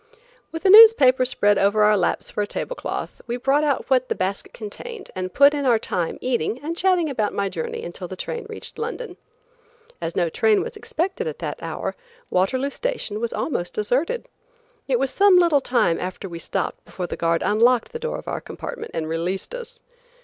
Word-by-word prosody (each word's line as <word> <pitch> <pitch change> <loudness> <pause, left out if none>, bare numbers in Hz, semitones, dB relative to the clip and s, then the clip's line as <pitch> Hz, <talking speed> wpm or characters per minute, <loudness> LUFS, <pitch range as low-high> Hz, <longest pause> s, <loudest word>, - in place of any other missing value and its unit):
With 325 +3 -7
a - - +6
newspaper 385 - +8
spread 205 -5 +2
over 205 +2 +3
our 210 0 +5
laps 185 - -1
for - - -2
a 205 - -1
table - - -4
cloth, - - -5
we 240 +1 -2
brought 275 +4 +2
out 285 -3 0
what 255 -1 +2
the - - 0
basket 190 +2 -3
contained 400 - -9
and 185 0 -3
put 280 +5 +6
in 290 -1 -2
our 245 -4 +4
time 180 -6 -2
eating 245 -2 -1
and 330 +3 -3
chatting 360 -2 +2
about 220 -8 -1
my 200 -1 0
journey 465 - -5
until - - -7
the - - -7
train 470 -3 -5
reached 440 - -8
London. 470 +2 -5 0.9
As 165 - -4
no 175 -2 +2
train 215 +6 +2
was 475 +1 -7
expected 390 +8 -3
at 470 - -4
that - - -5
hour, - - -4 0.4
Waterloo 260 +9 +1
Station 475 - -3
was 235 0 -2
almost 175 - -3
deserted. 270 - -1 0.6
It 260 -3 +2
was 265 +1 0
some 395 +2 +5
little 335 -5 +4
time 240 -11 +1
after 185 +2 -5
we 170 -2 -7
stopped - - -3
before 180 - -6
the - - -5
guard 165 0 0
unlocked 235 +3 +3
the 470 - -5
door 475 +1 -3
of - - -11
our - - -3
compartment - - -7
and 160 -1 -2
released 170 - -3
us. 485 -1 -9
255 Hz, 200 wpm, -23 LUFS, -, 0.9 s, newspaper